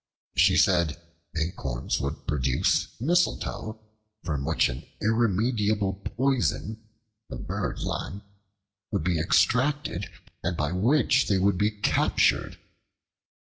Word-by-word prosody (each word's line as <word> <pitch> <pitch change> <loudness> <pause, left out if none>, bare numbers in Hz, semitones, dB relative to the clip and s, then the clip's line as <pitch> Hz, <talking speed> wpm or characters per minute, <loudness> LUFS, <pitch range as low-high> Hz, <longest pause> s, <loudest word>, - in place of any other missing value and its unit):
She 90 +1 +5
said 85 -5 +3 0.4
acorns 80 -7 -2
would 70 +3 -4
produce 65 -3 +1
mistletoe, 130 -7 0 0.4
from 70 -5 -2
which 80 +1 +2
an 60 +1 -6 0.2
irremediable 110 -2 +1
poison, 120 -4 -1 0.5
the - - -6
bird - - -4
lime, 100 +2 -4 0.7
would 100 -6 -1
be 85 -1 +1
extracted 130 - +1 0.3
and 90 -1 -2
by 75 0 -1
which 120 +7 +3
they 100 - +2
would 95 0 +2
be 105 +1 +3
captured. 105 -1 +1
100 Hz, 105 wpm, -26 LUFS, 80-115 Hz, 0.7 s, She